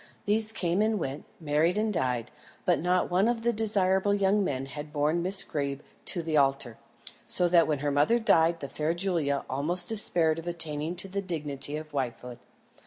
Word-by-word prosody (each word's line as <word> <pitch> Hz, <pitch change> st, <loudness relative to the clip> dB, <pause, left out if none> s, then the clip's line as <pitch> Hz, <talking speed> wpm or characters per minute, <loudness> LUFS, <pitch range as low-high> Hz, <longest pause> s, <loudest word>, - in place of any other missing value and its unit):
These 215 Hz, +1 st, 0 dB
came 180 Hz, -3 st, -1 dB
and 220 Hz, 0 st, +1 dB
went, 140 Hz, -5 st, -5 dB
married 160 Hz, +4 st, +1 dB
and 215 Hz, 0 st, 0 dB
died; 125 Hz, -, -2 dB, 0.3 s
but -, -, +2 dB
not 180 Hz, +2 st, 0 dB
one 190 Hz, +4 st, +2 dB
of 235 Hz, -1 st, -1 dB
the 235 Hz, 0 st, +1 dB
desirable 200 Hz, -2 st, +1 dB
young 200 Hz, +1 st, +2 dB
men 135 Hz, -7 st, -3 dB
had 150 Hz, +2 st, -8 dB
borne 150 Hz, +3 st, 0 dB
Miss 190 Hz, +3 st, +6 dB
Greeb 140 Hz, -2 st, -4 dB, 0.2 s
to 175 Hz, -, 0 dB
the 160 Hz, -1 st, -1 dB
altar, 135 Hz, -4 st, 0 dB, 0.5 s
so 180 Hz, -, +3 dB
that 170 Hz, -1 st, +4 dB
when 150 Hz, -2 st, 0 dB
her 145 Hz, -, +1 dB
mother 145 Hz, +12 st, +3 dB
died 170 Hz, -7 st, +2 dB
the 140 Hz, -, -4 dB
fair 155 Hz, +4 st, -2 dB
Julia 170 Hz, -7 st, -1 dB
almost 170 Hz, +7 st, +1 dB
despaired 170 Hz, -7 st, +3 dB
of 165 Hz, -, -10 dB
attaining 160 Hz, -1 st, -2 dB
to 180 Hz, -, -1 dB
the 200 Hz, +1 st, -3 dB
dignity 150 Hz, -5 st, -4 dB
of 155 Hz, 0 st, -9 dB
wifehood. 125 Hz, -2 st, -5 dB
165 Hz, 185 wpm, -27 LUFS, 145-195 Hz, 0.5 s, Miss